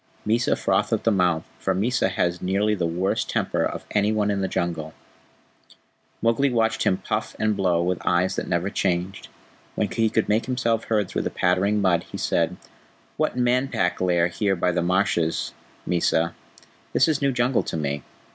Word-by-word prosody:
Mysa 115 Hz, +2 st, +2 dB
frothed -, -, 0 dB
at -, -, 0 dB
the 115 Hz, -, +3 dB
mouth, 90 Hz, -5 st, +2 dB, 0.2 s
for -, -, 0 dB
Mysa 110 Hz, 0 st, +1 dB
has 90 Hz, -1 st, -1 dB
nearly 100 Hz, +3 st, +1 dB
the 90 Hz, -5 st, 0 dB
worst 90 Hz, +4 st, -1 dB
temper -, -, 0 dB
of -, -, -3 dB
any 105 Hz, 0 st, +2 dB
one 105 Hz, -1 st, +1 dB
in 100 Hz, -1 st, -1 dB
the 95 Hz, -, 0 dB
Jungle. 85 Hz, -4 st, -3 dB, 1.3 s
Mowgli 115 Hz, +5 st, +3 dB
watched 115 Hz, -2 st, +1 dB
him 95 Hz, -, +3 dB
puff 105 Hz, +3 st, -3 dB
and 110 Hz, -1 st, +1 dB
blow 90 Hz, -3 st, +1 dB
with 90 Hz, 0 st, -1 dB
eyes 90 Hz, +2 st, +1 dB
that -, -, -3 dB
never 85 Hz, +3 st, -1 dB
changed. 90 Hz, +1 st, -1 dB, 0.5 s
When -, -, 0 dB
he 115 Hz, -1 st, +1 dB
could 110 Hz, -, 0 dB
make 105 Hz, +4 st, +1 dB
himself 115 Hz, -3 st, 0 dB
heard 105 Hz, -3 st, +1 dB
through -, -, -2 dB
the -, -, -2 dB
pattering 95 Hz, +4 st, +1 dB
mud, 85 Hz, -3 st, +2 dB
he -, -, -5 dB
said: -, -, 0 dB, 0.6 s
"What -, -, -1 dB
Man 125 Hz, +2 st, +2 dB
Pack 90 Hz, -9 st, -1 dB
lair 90 Hz, -2 st, +3 dB
here 95 Hz, +3 st, 0 dB
by 90 Hz, 0 st, +1 dB
the 85 Hz, 0 st, 0 dB
marshes, 85 Hz, -2 st, 0 dB, 0.3 s
Mysa? 85 Hz, -1 st, +1 dB, 0.6 s
This -, -, +4 dB
is 155 Hz, -3 st, 0 dB
new 140 Hz, -1 st, +2 dB
Jungle 125 Hz, 0 st, +1 dB
to -, -, -4 dB
me." 70 Hz, -2 st, -2 dB
95 Hz, 185 wpm, -24 LUFS, 90-110 Hz, 1.3 s, This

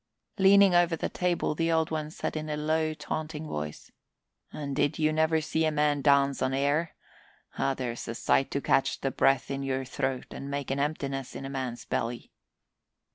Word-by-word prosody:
Leaning 195 Hz, 0 st, +7 dB
over 175 Hz, -1 st, +4 dB
the -, -, -3 dB
table, 180 Hz, -3 st, 0 dB
the 165 Hz, +2 st, 0 dB
Old 160 Hz, -1 st, +1 dB
One 155 Hz, -1 st, -2 dB
said 155 Hz, -, -4 dB
in 155 Hz, 0 st, -4 dB
a 150 Hz, -, -2 dB
low, 155 Hz, +1 st, 0 dB
taunting 155 Hz, 0 st, -4 dB
voice, 75 Hz, -, -6 dB, 0.6 s
"And 140 Hz, -2 st, -5 dB
did 145 Hz, 0 st, +1 dB
you 155 Hz, 0 st, +2 dB
never 160 Hz, 0 st, +2 dB
see 160 Hz, +2 st, 0 dB
a 160 Hz, -, +3 dB
man 150 Hz, -1 st, +1 dB
dance 140 Hz, -1 st, +3 dB
on 130 Hz, 0 st, +1 dB
air? 145 Hz, +4 st, 0 dB, 0.6 s
Ah, 135 Hz, -, +1 dB
there's 120 Hz, -2 st, -4 dB
a 115 Hz, -, -4 dB
sight 135 Hz, -, +2 dB
to 140 Hz, -, -2 dB
catch 135 Hz, -, +1 dB
the 135 Hz, -, 0 dB
breath 135 Hz, +1 st, +2 dB
in 135 Hz, 0 st, -2 dB
your 135 Hz, -1 st, -2 dB
throat 130 Hz, 0 st, -2 dB
and 140 Hz, -, -7 dB
make 140 Hz, -1 st, -3 dB
an 135 Hz, -, -1 dB
emptiness 140 Hz, -3 st, -2 dB
in 135 Hz, -, -6 dB
a 135 Hz, -, -5 dB
man's 125 Hz, -3 st, -4 dB
belly!" 115 Hz, +1 st, -3 dB
145 Hz, 190 wpm, -28 LUFS, 135-155 Hz, 0.6 s, Leaning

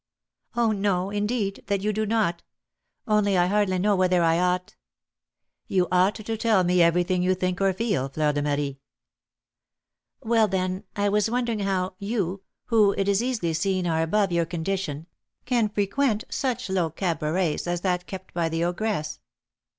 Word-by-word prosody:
"Oh, 235 Hz, -2 st, +2 dB
no, 195 Hz, -2 st, 0 dB
indeed, 205 Hz, -1 st, -2 dB
that 200 Hz, -1 st, 0 dB
you 210 Hz, +1 st, 0 dB
do 215 Hz, +1 st, -1 dB
not; 205 Hz, -6 st, 0 dB, 0.7 s
only 210 Hz, -3 st, +2 dB
I 175 Hz, -, +4 dB
hardly 195 Hz, 0 st, +1 dB
know 200 Hz, +3 st, +2 dB
whether 185 Hz, -2 st, +3 dB
I 165 Hz, 0 st, +3 dB
ought 180 Hz, 0 st, 0 dB, 0.5 s
" -, -, -60 dB
"You 185 Hz, -2 st, +1 dB
ought 185 Hz, +3 st, +3 dB
to 220 Hz, +1 st, -4 dB
tell 215 Hz, -4 st, +3 dB
me 180 Hz, 0 st, +3 dB
everything 175 Hz, +2 st, +3 dB
you 185 Hz, +1 st, +2 dB
think 185 Hz, 0 st, -2 dB
or 195 Hz, 0 st, +4 dB
feel, 190 Hz, -, -1 dB
Fleur 150 Hz, +2 st, 0 dB
de 145 Hz, -, -1 dB
Marie." 145 Hz, -1 st, -2 dB, 1.4 s
"Well, 225 Hz, -1 st, +3 dB
then, 185 Hz, -1 st, -2 dB
I 205 Hz, 0 st, +1 dB
was 210 Hz, +2 st, +2 dB
wondering 235 Hz, -2 st, -1 dB
how 190 Hz, -2 st, -1 dB
you, 200 Hz, -3 st, -2 dB, 0.2 s
who, 215 Hz, -4 st, +4 dB
it 195 Hz, -, 0 dB
is 200 Hz, +1 st, +2 dB
easily 235 Hz, -10 st, -1 dB
seen, 185 Hz, +3 st, 0 dB
are 160 Hz, -1 st, +1 dB
above 195 Hz, +4 st, +1 dB
your 170 Hz, -1 st, +1 dB
condition, 165 Hz, -3 st, -3 dB, 0.4 s
can 235 Hz, -4 st, +1 dB
frequent 215 Hz, +3 st, 0 dB
such 255 Hz, -6 st, -2 dB
low 185 Hz, -4 st, 0 dB
cabarets 165 Hz, 0 st, -1 dB
as 175 Hz, 0 st, -1 dB
that 180 Hz, -1 st, -1 dB
kept 190 Hz, -1 st, -8 dB
by 170 Hz, -1 st, 0 dB
the 165 Hz, +1 st, -1 dB
ogress." 175 Hz, -3 st, -2 dB
190 Hz, 165 wpm, -25 LUFS, 175-210 Hz, 1.4 s, I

